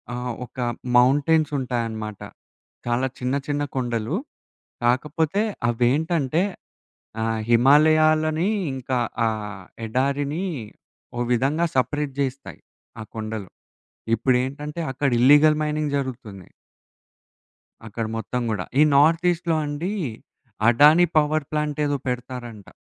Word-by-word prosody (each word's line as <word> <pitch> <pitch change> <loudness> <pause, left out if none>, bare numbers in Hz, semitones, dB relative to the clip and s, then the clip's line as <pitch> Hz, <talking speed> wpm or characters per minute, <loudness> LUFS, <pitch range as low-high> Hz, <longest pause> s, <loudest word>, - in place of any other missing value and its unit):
ఆహ్, 125 0 -3
ఒక 125 - -24 0.4
మౌంటెన్స్ 145 +5 +3
ఉంటాయన్నమాట. 115 -5 -3 0.7
చాలా 120 +2 +1
చిన్న 125 +1 -1
చిన్న 145 0 0
కొండలు. 120 +3 -1 0.7
కాకపోతే 150 - +1 0.3
అవేంటంటే 145 +6 +1 0.8
ఆహ్, 110 0 -1
హిమాలయాలని 155 +6 +4 0.3
ఇంకా 130 -1 -2 0.3
ఆ - - +3 0.6
ఎడారిని 140 - -1 0.7
ఓ - - -2
విధంగా 140 +8 +1
సపరేట్ 145 +2 0
జేస్తాయి 135 0 -3 0.4
ఆ - - -5
కొండలు. 110 -3 -5 0.7
ఇప్పుడేంటంటే 135 +6 -1
అక్కడ 140 +2 0
ఇల్లీగల్ 150 +4 +6
మైనింగ్ 150 -1 -1
జరుగుతోంది. 120 -9 -6 1.4
అక్కడ 115 +2 -4
మొత్తం 125 +2 -3
గూడా 100 -4 -2
ఈ - - +8
నార్త్ 160 +4 +4
ఈస్ట్‌లో 170 -1 -1
అండి. 150 +7 -3 0.8
అడానీ 150 +8 +6
పవర్ 155 0 +2
ప్లాంట్ 150 -1 -2
ఏదో 145 -1 0
పెడతారంట. 125 -4 -5
140 Hz, 100 wpm, -23 LUFS, 120-150 Hz, 1.4 s, ఈ